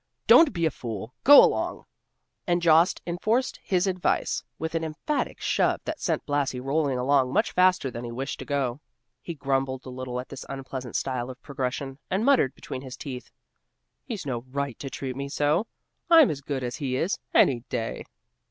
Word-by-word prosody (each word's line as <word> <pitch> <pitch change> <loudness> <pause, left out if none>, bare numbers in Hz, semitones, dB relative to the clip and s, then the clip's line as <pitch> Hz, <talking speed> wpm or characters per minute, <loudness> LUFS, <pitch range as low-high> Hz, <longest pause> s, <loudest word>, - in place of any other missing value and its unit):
Don't 325 -3 +7
be 170 -5 -1
a 160 - +2
fool! 115 -2 -6
Go 285 +1 +10
along!" - - 0 0.6
and 175 0 +2
Jost 165 +1 +4
enforced 215 +9 0
his 185 -1 +1
advise 185 -2 0
with 160 0 -4
an 165 -1 -1
emphatic 160 - -3
shove - - +1
that 315 -1 -4
sent 165 -4 -1
Blasi 145 -3 -1
rolling 135 0 0
along 130 0 +2
much 215 - +1
faster 185 -7 +3
than 120 +1 -6
he 120 - -5
wished 135 +4 -4
to - - -7
go. 140 -2 -1 0.4
He 170 - -6
grumbled 135 -2 -1
a - - -7
little 125 -1 -5
at 125 - -7
this - - -8
unpleasant 130 -2 -6
style 130 -2 -2
of 130 0 -9
progression, 135 -1 -4
and 195 +4 0
muttered 265 - +3
between 130 - -7
his 130 -2 -9
teeth, 130 -4 -7 0.7
"He's 220 - -6
no 120 -4 -3
right 140 -2 -3
to 135 - -5
treat 130 -1 -5
me 140 +1 -4
so; 150 +9 +1 0.4
I'm 325 -5 +7
as 140 -2 -5
good 135 -2 -3
as 120 0 -4
he 135 -4 -2
is, 165 +9 -1 0.2
any 125 -3 +5
day." 115 - -3
140 Hz, 185 wpm, -26 LUFS, 130-170 Hz, 0.7 s, Go